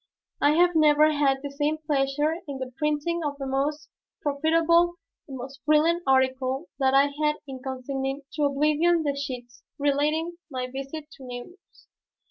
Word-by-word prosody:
I 290 +1 +5
have 350 +2 +4
never 305 -1 +5
had 275 -2 +1
the 285 - -4
same 295 +2 0
pleasure 295 +1 0
in 280 -2 -5
the 260 -1 -5
printing 300 +3 0
of 290 -1 -3
the 275 - -5
most 280 +3 -1 0.4
profitable, 330 +4 +3 0.3
the 270 - -7
most 265 +2 -9
brilliant 315 +3 +3
article 260 +2 +1
that 265 0 +3
I 280 +1 +5
had 300 0 +3
in 260 -1 -7
consigning 270 +1 -4
to 300 - +1
oblivion 305 +4 +2
the 285 -2 0
sheets 250 -4 -6 0.2
relating 300 +4 0
my 255 -3 -3
visit 275 +4 -7
to 270 - -13
Nemours. 250 +10 -11
285 Hz, 155 wpm, -26 LUFS, 270-310 Hz, 0.4 s, I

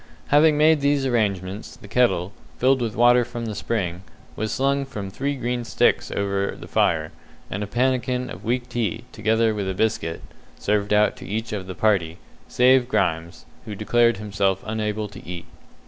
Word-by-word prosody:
Having 150 +1 +5
made 155 0 +4
these 140 -1 +2
arrangements, 100 -5 -1
the 110 - -13
kettle, 105 -5 +1 0.2
filled 130 +1 +3
with 115 -3 -2
water 120 +1 +5
from 120 0 -6
the 110 - -4
spring, 95 -5 -2 0.3
was 110 0 -3
slung 140 +1 +1
from 105 -8 -6
three 140 +7 -2
green 120 -1 -2
sticks 115 - +1
over 100 0 -1
the - - -9
fire, 80 -2 +1 0.4
and 100 - -3
a - - -5
pannikin 125 +2 0
of - - -9
weak 120 +2 -1
tea, 120 -2 -2
together 110 0 +1
with 100 -2 -3
a 95 - -3
biscuit, 90 -6 -1 0.3
served 105 0 0
out 105 0 +3
to - - -10
each 110 +2 -3
of 95 -3 -4
the 95 - -6
party, 85 -5 +1 0.3
save 125 0 +4
Grimes, 85 -6 -1 0.2
who 105 - -6
declared 115 +2 +2
himself 100 -2 -1
unable 110 -1 -2
to 100 - -12
eat. 85 -1 -7
110 Hz, 175 wpm, -23 LUFS, 100-125 Hz, 0.4 s, Having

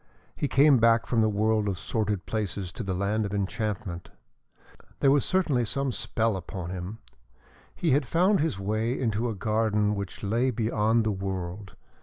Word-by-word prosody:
He 145 - -1
came 140 -1 +5
back 115 0 +4
from 115 -2 +1
the 110 - +3
world 110 0 +1
of 95 - -2
sordid 105 +1 -2
places 100 -4 -3
to 115 - -7
the 95 -4 -2
land 100 +3 0
of 100 0 -3
enchantment. 100 -3 -3 0.9
There 135 - +4
was 145 -1 +3
certainly 160 -10 +1
some 135 +4 -1
spell 115 -2 -1
upon 90 -1 -6
him. 95 +4 -5 0.8
He 165 - 0
had 135 0 +2
found 185 - +3
his 155 -9 0
way 110 +5 -1
into 115 -1 0
a 110 - -3
garden 105 0 +1
which 100 0 -6
lay 115 +6 +1
beyond 110 -1 +1
the 110 - 0
world. 95 0 -5
110 Hz, 170 wpm, -27 LUFS, 100-120 Hz, 0.9 s, came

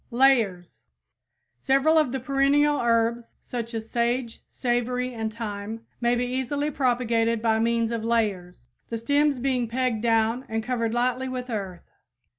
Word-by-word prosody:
LAYERS 235 -9 +2 0.8
Several 275 - +3
of 300 -5 +1
the 265 - -2
perennial 280 +3 +2
herbs, 230 0 +1
such 235 -1 -6
as 220 0 -4
sage, 235 0 -1
savory, 250 +1 -1
and 220 -1 -3
thyme, 220 0 -6
may 240 +1 +2
be 245 +1 0
easily 265 +4 -2
propagated 235 -4 +1
by 220 0 +1
means 230 0 +1
of 230 -1 -2
layers, 195 - -1 0.2
the 230 - -2
stems 285 +4 +2
being 250 -1 0
pegged 245 -1 -1
down 225 +1 +2
and 225 0 -2
covered 230 -1 -1
lightly 255 +2 0
with 250 -1 -5
earth. 195 -5 -5
235 Hz, 145 wpm, -25 LUFS, 225-255 Hz, 0.8 s, Several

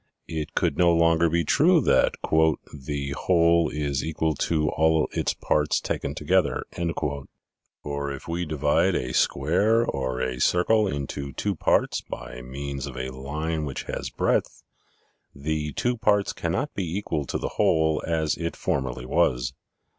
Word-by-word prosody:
It 80 -2 -5
could 70 - 0
no 85 -1 +5
longer 85 0 +4
hold 85 0 +1
true - - +5
that - - +3 0.4
" - - -10
the 70 -2 -2
whole 85 +1 +3
is 70 -3 -2
equal 80 0 0
to 75 +1 0
all 80 0 +2
its - - -1
parts 75 0 +1
taken 70 - -3
together," 75 -3 +1 1.2
for 70 -1 -3
if 70 - -8
we 85 +2 -2
divide 75 -2 +1
a 60 0 -2
square 100 - +2
or 65 - -2
a 65 -1 -2
circle 105 +5 +3
into 70 -3 -4
two 100 +8 -1
parts 85 - +1
by 65 0 -8
means 70 +2 -5
of - - -8
a 65 +1 -3
line 75 +4 -3
which 70 -3 -4
has - - -4
breadth, - - -1 0.7
the 75 +1 -2
two 120 - 0
parts 105 -2 +2
cannot - - -2
be 90 -2 -3
equal 80 -8 -2
to - - -2
the - - -3
whole 80 0 +2
as 80 -2 0
it 85 0 -3
formerly 65 -2 -2
was. 60 0 +1
75 Hz, 155 wpm, -25 LUFS, 70-85 Hz, 1.2 s, no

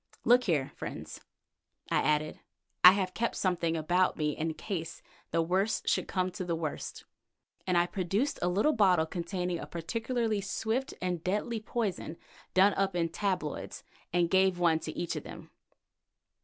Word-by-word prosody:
Look 250 +1 +5
here, 150 -7 +1
friends," - - -7 0.7
I - - +3
added, 150 0 0 0.4
"I 180 - +12
have 190 -2 -1
kept 235 +1 -1
something 170 -3 0
about 175 +4 +2
me 150 -1 +1
in 160 0 -2
case 170 -5 -5 0.3
the 165 0 +1
worst 190 +6 0
should - - +1
come 185 -1 -1
to 185 - -5
the 175 -2 -1
worst," 160 -2 -5 0.6
and 180 -1 +2
I 175 - +4
produced 195 +9 -1
a - - +1
little 210 +12 +2
bottle 185 - +4
containing 180 0 -3
a - - -7
particularly 225 +5 -2
swift 225 +6 -2
and 180 -3 -2
deadly 210 +5 -1
poison 210 -7 -3 0.4
done 195 +2 +6
up 195 -2 0
into 165 -1 0
tabloids, 185 -7 -3 0.3
and 175 0 +2
gave 190 -1 +4
one 170 -2 +3
to 155 -1 -7
each 175 - -2
of - - -3
them. - - -10
180 Hz, 160 wpm, -30 LUFS, 165-200 Hz, 0.7 s, I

